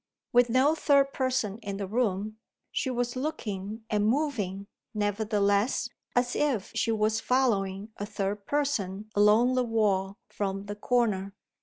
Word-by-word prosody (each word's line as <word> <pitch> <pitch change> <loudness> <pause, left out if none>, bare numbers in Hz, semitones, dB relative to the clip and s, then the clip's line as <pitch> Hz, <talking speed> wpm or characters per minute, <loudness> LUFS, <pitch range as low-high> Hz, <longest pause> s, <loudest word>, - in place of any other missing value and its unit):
With 245 0 +5
no 260 +6 +4
third 280 -3 +3
person 255 -6 -1
in 200 -3 -5
the 200 - -3
room, 215 -1 -1 0.3
she 265 - -1
was 245 -1 -1
looking, 220 -6 -4
and 210 -1 +1
moving, 220 -8 -1 0.3
nevertheless, 205 +1 +1 0.3
as 245 0 +1
if 265 -10 0
she 230 - +1
was 220 0 +1
following 210 -6 0
a 205 - -4
third 200 0 -3
person 215 -8 -1
along 210 +5 +5
the 255 0 +2
wall, 205 -4 +1
from 195 -1 -3
the 205 0 -5
corner. 205 -4 0
215 Hz, 140 wpm, -28 LUFS, 200-250 Hz, 0.3 s, With